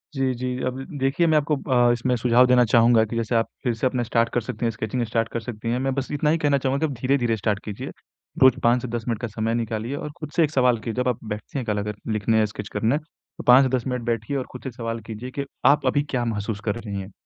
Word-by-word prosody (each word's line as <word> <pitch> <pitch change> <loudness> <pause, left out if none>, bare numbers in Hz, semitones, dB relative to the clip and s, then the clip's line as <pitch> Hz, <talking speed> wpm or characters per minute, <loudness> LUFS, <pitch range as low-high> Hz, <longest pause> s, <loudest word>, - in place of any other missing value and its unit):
जी, 135 -1 +1
जी 125 +1 -4 0.2
अब 130 +1 -3
द 135 - -9
देखिए 135 +6 +2
मैं 155 -1 +4
आपको 150 0 +1 0.2
अ, 120 -1 +5
इसमें 125 +1 0
सुझाव 120 +1 +4
देना 125 0 +5
चाहूँगा 115 0 +5
कि 110 - -6
जैसे 115 0 -1
आप 115 0 +2 0.2
फिर 125 -3 +1
से 115 +3 0
अपना 125 -1 -1
स्टार्ट 115 0 +1
कर 120 - +1
सकती 115 - -4
हैं, 115 - +1
स्केचिंग 110 +2 -3
स्टार्ट 115 0 0
कर 115 - -1
सकती 115 0 -6
हैं। 125 - 0
मैं 135 0 0
बस 135 -1 -2
इतना 150 +1 +1
ही 160 - +3
कहना 145 -3 +2
चाहूँगा 135 0 0
कि 155 - -2
आप 130 - -7
धीरे-धीरे 125 -3 +1
स्टार्ट 105 -1 0
कीजिए। 105 -2 -6 0.5
रोज़ 130 -2 +6
5 120 +1 +4
से 125 - -4
10 120 -1 -3
मिनट 115 -3 -1
का 120 - -2
समय 110 +1 -2
निकालिए 115 +2 -2
और 150 - -5
खुद 155 -2 -7
से 170 - +4
एक 150 - 0
सवाल 125 -4 +3
की 115 - -1
जब 125 +2 -1
आप 125 -2 0
बैठते 110 +4 -6
हैं 130 - -2
कल 105 -2 -1
अगर 105 0 -3 0.2
लिखने, 110 +1 +2
स्केच 105 0 -7
करने 115 +5 +1
अ, - - 0 0.5
5-10 130 0 +6
मिनट 125 -1 -2
बैठिए 120 +4 -1
और 130 - -3
खुद 125 - -10
से 130 - -4
सवाल 115 -1 -4
कीजिए 115 +3 -6
के 140 - -2 0.2
आप 145 -1 +5
अभी 140 +3 +3
क्या 125 -2 -1
महसूस 105 -2 -3
कर 105 - 0
रही 100 -4 -5
हैं। 95 +2 -10
120 Hz, 270 wpm, -24 LUFS, 115-130 Hz, 0.5 s, रोज़